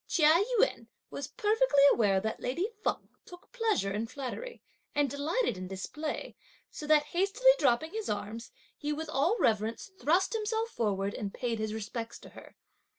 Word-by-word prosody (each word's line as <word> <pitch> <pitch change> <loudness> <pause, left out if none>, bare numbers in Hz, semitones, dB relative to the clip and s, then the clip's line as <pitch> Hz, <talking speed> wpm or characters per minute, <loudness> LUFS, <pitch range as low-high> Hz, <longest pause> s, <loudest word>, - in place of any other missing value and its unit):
Chia 320 +3 +5 0.2
Yün - - +2 0.2
was - - -5
perfectly 440 - +3
aware 200 -4 +3
that 220 +3 -3
lady 340 +11 -1 0.2
Feng - - -1 0.2
took 355 -1 -14
pleasure 445 - 0
in 215 +3 -2
flattery, 280 - -6 0.3
and 290 -1 +3
delighted 285 - -1
in 185 - -5
display, 300 +12 -5 0.4
so 300 - -7
that 305 -1 +5
hastily 400 +8 +4
dropping 250 +7 +2
his 440 +1 -4
arms, 210 +3 -4 0.3
he 295 0 -3
with 315 +2 -4
all 330 - +2
reverence, 220 - 0
thrust 350 +9 +2
himself 445 +1 -1
forward 200 - -1
and 200 -2 -5
paid 235 -3 -2
his 215 0 -2
respects 225 +2 -5
to - - -13
her. - - -14
290 Hz, 160 wpm, -30 LUFS, -, 0.4 s, Chia